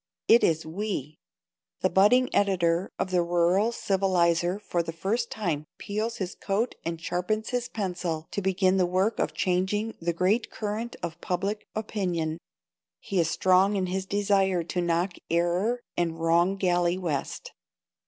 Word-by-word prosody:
It 235 - +6
is 160 -1 +2
"we." 160 -4 -4 0.6
The 185 - +3
budding 250 +7 +4
editor 180 -3 +2
of 185 - -2
the 180 -1 +3
rural 175 +5 +2
civilizer 180 -4 +1
for 180 -4 -1
the 165 -1 -5
first 210 +8 -1
time 160 -8 -2
peels 215 +3 -3
his 185 -2 -3
coat 215 +5 -1
and 165 0 -3
sharpens 180 +6 -2
his 245 0 -2
pencil 180 -7 -3
to 200 - -2
begin 190 0 +2
the 180 -2 +3
work 190 +5 +1
of - - -1
changing 190 +4 0
the 170 +1 0
great 185 +7 +1
current 220 +3 -4
of 165 0 -5
public 195 +4 -2
opinion. 180 -7 -2 0.6
He 195 - -2
is 165 -1 +2
strong 185 +4 +3
in 190 -2 0
his 190 +1 -3
desire 195 -3 +2
to 175 +2 -2
knock 175 +1 0
error 180 +8 +1
and 165 -1 -1
wrong 170 +3 +3
galley 175 -2 +2
west. 160 -7 -4
185 Hz, 155 wpm, -27 LUFS, 170-205 Hz, 0.6 s, It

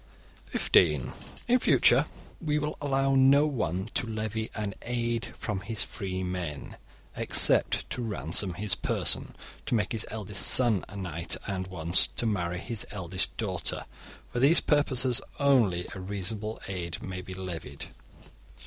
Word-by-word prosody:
(15) - - +2 0.3
In 250 +1 +4
future - - +4 0.4
we 150 -1 +1
will 150 0 -2
allow 135 -1 +1
no 135 +2 +5
one 95 - -2
to 120 - -1
levy 110 0 -3
an 105 -2 -3
'aid' 120 -1 -2
from 105 -4 -3
his 100 -2 -1
free 95 -2 -5
men, 90 -5 -5 0.4
except - - +2
to 125 - -3
ransom 90 - 0
his 105 0 +1
person, - - +1 0.3
to - - +1
make 105 -2 0
his 115 -3 +2
eldest 105 -2 -3
son 120 -7 +5
a 100 - -11
knight, 85 -4 -3
and 95 -2 -3
(once) 85 -1 +2
to - - -1
marry 90 -5 -1
his 110 +3 -2
eldest 95 -1 -1
daughter. 95 -5 -2 0.5
For 120 - -1
these 140 +7 +6
purposes 130 -4 +2 0.2
only 115 -11 +3
a - - -7
reasonable 100 +3 -3
'aid' 90 -3 -5
may 95 -1 -5
be 95 0 -8
levied. 90 -3 -6
105 Hz, 145 wpm, -28 LUFS, 90-120 Hz, 0.5 s, these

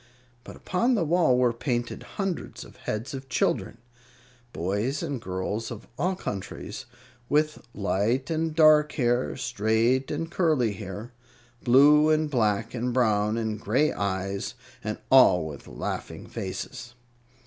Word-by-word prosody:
But - - -10
upon 235 +7 +1
the 195 - +1
wall 160 -5 +3
were 125 -1 +3
painted 120 0 -2 0.2
hundreds 195 -4 -3
of - - -15
heads 110 +6 -4
of 135 0 -7
children - - 0 0.7
boys 105 - -2
and 140 -7 -3
girls 95 +4 -3
of 115 -3 -8
all 185 +8 0
countries, 100 - -6 0.4
with 155 +1 +1
light 110 - 0
and 160 -1 -1
dark 155 -1 +6
hair, 120 -2 0
straight 120 +1 +1
and 165 +2 -3
curly 150 - +2
hair, 100 +4 -7 0.5
blue 145 +5 +6
and 155 -1 +2
black 110 -3 +1
and 125 0 -2
brown 110 -3 +2
and 110 -2 -2
gray 135 +9 +2
eyes, 100 +3 -3 0.3
and 105 0 -3
all 95 -11 +6
with 75 -3 -8
laughing - - -5
faces. 120 +5 -6
120 Hz, 135 wpm, -26 LUFS, 105-150 Hz, 0.7 s, dark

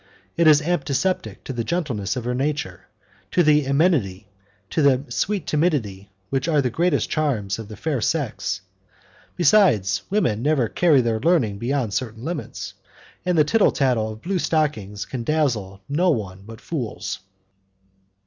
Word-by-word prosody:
It 170 -1 +3
is 150 -1 +6
antipathetic 150 - -1
to 135 - -5
the 120 -2 -2
gentleness 120 - -2
of 125 - -3
her 125 - -1
nature, 125 - -3 0.4
to 175 - +3
the 150 -2 +4
amenity, 135 - +1 0.4
to 160 - +1
the 135 -2 +4
sweet 200 -4 -1
timidity 125 - -1 0.2
which 135 +2 0
are 155 -3 +3
the 130 -3 +1
greatest 165 +2 +1
charms 115 -11 -1
of 110 - -7
the 110 -1 -10
fair 145 -1 -2
sex, 110 - -1 0.7
besides, 125 - +4
women 120 - +1
never 140 -3 +2
carry 155 +1 +3
their 115 -2 0
learning 115 - +2
beyond 120 -3 -1
certain 115 -2 -3
limits, 165 +1 -5 0.5
and 180 -2 +2
the 155 - +6
tittle 210 +8 +3
tattle 115 -5 +1
of 110 - -14
blue 185 +1 -1
stockings 110 - -1
can 125 -3 -5
dazzle 115 -10 -1
no 170 +6 +2
one 100 - -2
but 115 +1 -10
fools. 130 -10 -4
135 Hz, 155 wpm, -23 LUFS, 110-155 Hz, 0.7 s, is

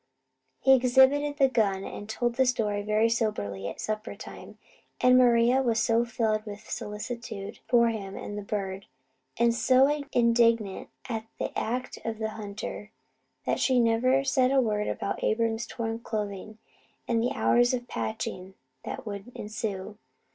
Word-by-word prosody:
He 265 - +6
exhibited 265 +3 +4
the 275 -2 +5
gun, 205 -6 +1
and 205 +1 -7
told 240 +1 -1
the 260 +1 +2
story 210 -4 0
very 215 +2 +2
soberly 210 - -1
at - - -7
supper 215 +1 -4
time; - - -11 0.4
and 250 0 +5
Maria 245 +1 +5
was 230 -3 +1
so 230 +1 +2
filled 220 -2 0
with 210 -1 -9
solicitude 215 -1 -6
for 235 -1 +4
him 200 -3 -5
and 205 - -6
the 205 - -4
bird, 195 -1 -4 0.5
and 235 0 +3
so 270 +5 +3
indignant 230 -4 +2 0.2
at 225 -3 -4
the - - -4
act 250 +3 -3
of 225 -1 -3
the 220 0 -2
hunter, 210 0 -7 0.6
that - - 0
she 260 -2 +3
never 245 +3 +3
said 260 -2 +2
a 270 0 +3
word 210 -4 0
about - - -3
Abram's 225 0 0
torn 225 -1 -4
clothing 215 -2 -5 0.5
and 230 -1 +1
the 245 - 0
hours 240 0 +3
of 245 -1 -3
patching 180 - -4 0.3
that - - -6
would 205 +2 -7
ensue. 210 -1 -5
225 Hz, 155 wpm, -28 LUFS, 210-245 Hz, 0.6 s, He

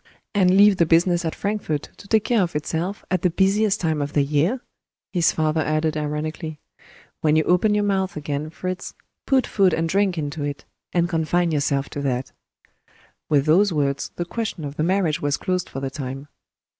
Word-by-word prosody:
"And 190 -2 +4
leave 205 -1 +6
the 170 - +3
business 170 +1 +3
at 160 - -2
Frankfort 200 -8 -2
to 200 - -14
take 220 0 +3
care 235 -4 +2
of 175 -3 -1
itself, 165 +6 -3
at 185 -2 +1
the 180 - +3
busiest 195 +4 +2
time 160 -3 0
of 145 +1 -3
the 145 - +3
year!" 150 - +1 0.5
his 170 -3 +3
father 155 0 0
added 155 +1 0
ironically. 155 +1 -4 0.6
"When 155 -1 +2
you 155 - +4
open 180 +5 +3
your 210 - +2
mouth 190 -3 0
again, 145 +1 -3
Fritz, 185 +3 -5 0.3
put 265 -2 +3
food 190 -4 +2
and 165 0 0
drink 195 0 +1
into 145 -1 -3
it 145 -1 -4 0.3
and 175 -1 +2
confine 170 0 +1
yourself 140 -2 0
to 145 - -4
that." 130 -2 -2 1.0
With 145 -2 +3
those 185 +6 +4
words 140 -3 -1
the 175 - -3
question 200 -5 -4
of 140 0 -6
the - - -2
marriage 175 -3 +1
was 145 -1 0
closed 185 -1 -2
for 135 - -6
the 135 -1 -3
time. 135 +1 -6
165 Hz, 190 wpm, -23 LUFS, 150-190 Hz, 1.0 s, leave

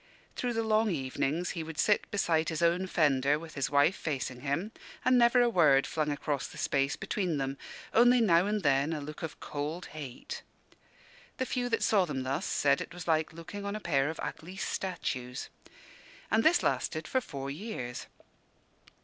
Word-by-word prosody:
Through 245 -1 -1
the 225 0 0
long 220 0 +3
evenings 150 +2 -1
he 165 - -4
would 160 -1 -8
sit 205 +6 +2
beside 165 -5 +1
his 160 0 -2
own 175 +3 +2
fender, 145 -4 +3
with 160 0 -10
his 140 -2 -1
wife 145 +5 +4
facing 135 -4 -3
him, 150 +9 -2 0.3
and 255 - +5
never 245 0 +5
a - - +4
word 155 -11 +5
flung 155 -2 -1
across 145 0 -2
the - - -12
space 140 0 +1
between 180 -7 -2
them, 135 0 -2 0.4
only 245 +2 +6
now 185 -4 +4
and 210 -2 -1
then 140 +2 +2
a 155 - -2
look 150 +1 -8
of 160 -3 -6
cold 150 +5 -4
hate. 140 -5 -7 1.0
The 260 - 0
few 245 -1 -1
that 225 - 0
saw 200 -4 +4
them 135 -5 -3
thus 135 +2 -2
said 140 -1 +2
it 180 - -7
was 175 -1 -8
like 160 -1 +2
looking 180 +5 -8
on 200 +1 -3
a - - -3
pair 145 -7 +1
of 160 - -6
ugly 180 +4 -6
statues. 130 -11 -3 0.8
And 220 +2 +4
this 335 +2 +4
lasted 155 -1 -1
for 260 - +1
four 140 - -6
years. 140 - -5
160 Hz, 185 wpm, -30 LUFS, 140-200 Hz, 1.0 s, only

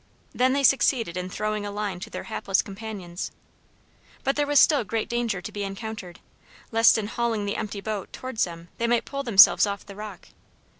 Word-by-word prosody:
They 255 - +3
then 275 +1 +1
succeeded 245 -8 +3
in 180 0 -4
throwing 215 +2 -2
a 205 - -4
line 205 -3 -3
to - - -7
their - - -6
hapless 195 -1 0
companions. 195 -4 -6 0.9
But 270 - +1
there 290 0 0
was 290 0 +5
still 290 -6 +5
great 220 +2 -2
danger 235 -6 -2
to - - -6
be 205 - -5
encountered, 195 -2 -7 0.5
lest 225 0 +6
in 215 - -2
hauling 225 -1 -1
the 200 - -2
empty 210 -2 -4
boat 210 -2 -4
towards 255 -3 -2
them 170 -1 -10
they 235 - +1
might 235 0 +2
pull 275 0 -4
themselves 215 -4 +7
off 200 0 -4
the 200 - -11
rock. 210 +1 -9
215 Hz, 195 wpm, -25 LUFS, 195-235 Hz, 0.9 s, themselves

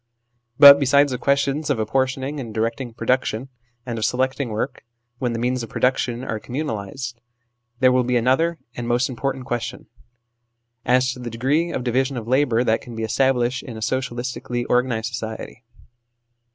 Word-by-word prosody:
But 140 0 +10
besides 140 +1 +4
the 125 - -3
questions 140 +2 +1
of 140 - +1
apportioning 130 +5 -1
and 120 -4 -6
directing 115 +3 -2
production 120 +1 -1 0.4
and 120 -2 -4
of - - -3
selecting 130 +1 0
work, 110 +5 -3 0.4
when 125 -3 -1
the - - -2
means 125 +2 0
of 115 - -6
production 125 -1 0
are 110 -4 -3
communalised 120 -2 -4 0.7
there 130 0 +6
will 125 0 +3
be 125 0 +1
another 135 +8 +2 0.2
and 120 -1 -4
most 120 +2 +1
important 130 +1 -3
question 120 -1 -4 1.0
as 130 +1 +3
to 125 - -11
the 120 -1 -5
degree 135 +9 0
of 135 -6 -3
division 130 +2 0
of 115 -2 -6
labour 125 -2 +2
that 115 -2 +1
can 120 -2 -10
be 110 - -4
established 125 +1 +1
in 115 -3 -8
a - - -8
socialistically 125 0 -3
organised 125 -2 +1
society. 110 +2 -6
125 Hz, 165 wpm, -22 LUFS, 120-135 Hz, 1.0 s, But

